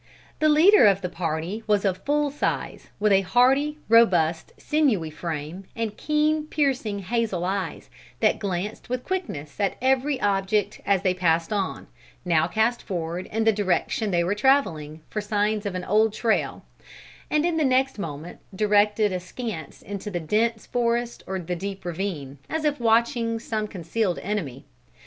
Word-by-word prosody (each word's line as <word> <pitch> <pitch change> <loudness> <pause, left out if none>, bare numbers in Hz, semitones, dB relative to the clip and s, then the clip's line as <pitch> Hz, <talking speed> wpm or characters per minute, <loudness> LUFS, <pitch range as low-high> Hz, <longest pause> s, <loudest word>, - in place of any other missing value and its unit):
The 310 - +4
leader 315 - +7
of 195 -1 +3
the 180 - -3
party 170 +4 -3
was 210 -1 +2
of 185 -1 0
full 290 +2 0
size, 290 - -3
with 210 0 +2
a 195 0 +5
hardy, 265 +9 +3
robust, 175 -8 +4
sinewy 245 - +1
frame, 160 +3 -5
and 225 -2 -3
keen 305 0 +1
piercing 265 -9 0
hazel 200 -3 -1
eyes, 195 +1 -3 0.3
that - - +2
glanced 200 +3 -4
with 250 0 -2
quickness 275 - -4
at 200 -2 +1
every 265 +2 +1
object 200 0 0
as 195 -2 +2
they 185 -2 +2
passed 170 0 +1
on, 195 -2 -2 0.4
now 165 -2 +3
cast 220 +5 +1
forward 175 -1 -4
in 225 +1 -1
the 225 - +5
direction 205 +1 0
they 175 -2 +2
were 180 +4 0
travelling, 165 - +1
for 210 - -3
signs 210 0 0
of 190 - -4
an 180 - -3
old 215 +3 +2
trail, 225 0 -1 0.6
and 305 +1 +2
in 345 -2 0
the 315 - +2
next 265 -2 +2
moment 160 -2 -6 0.2
directed 210 0 +3
askance 180 - -6
into 205 +1 -6
the 180 -4 -3
dense 220 +7 0
forest 235 0 -1
or 190 - -2
the 180 0 -4
deep 195 +1 -6
ravine, 165 -6 -4
as 315 -1 -2
if 295 -2 +1
watching 230 0 +2
some 220 -2 -3
concealed 185 +1 -2
enemy. 175 -11 -4
205 Hz, 160 wpm, -25 LUFS, 180-235 Hz, 0.6 s, leader